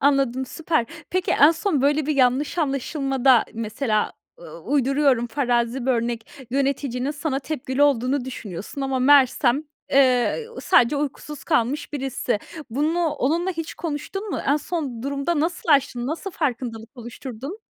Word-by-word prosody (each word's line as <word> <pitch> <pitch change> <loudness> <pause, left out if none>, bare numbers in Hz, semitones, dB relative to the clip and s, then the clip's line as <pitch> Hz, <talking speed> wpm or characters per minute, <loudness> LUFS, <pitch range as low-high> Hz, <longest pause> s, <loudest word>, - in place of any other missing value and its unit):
Anladım, 270 -2 +2
süper. 315 -4 -1 0.2
Peki, 370 0 0
en 290 - +7
son 330 -4 0
böyle 290 +1 +2
bir 305 - 0
yanlış 265 +5 +2
anlaşılmada, 270 -3 +2
mesela, 220 0 -1 0.3
ııı, - - -11
uyduruyorum, 275 -3 +2
farazi 245 -1 0
bir - - +3
örnek, 235 +2 -3
yöneticinin 270 -1 -1
sana 290 -2 -2
tepkili 275 -1 -2
olduğunu 270 -1 +2
düşünüyorsun 215 -1 -7
ama 270 -1 -1
meğersem, 270 0 +4 0.3
eee, 265 - +3
sadece 245 +4 +4
uykusuz 295 +1 -5
kalmış 290 -1 0
birisi. 265 -5 -2 0.3
Bunu 305 +7 0
onunla 315 +5 0
hiç 330 -3 -5
konuştun 345 +6 -5
mu? - - -2
En 285 +2 +4
son 290 -7 -4
durumda 280 +4 -1
nasıl 345 +2 -2
aştın? 270 -4 +3
Nasıl 330 +7 -4
farkındalık 240 -8 -3
oluşturdun? 250 - -8
275 Hz, 135 wpm, -23 LUFS, 245-300 Hz, 0.3 s, en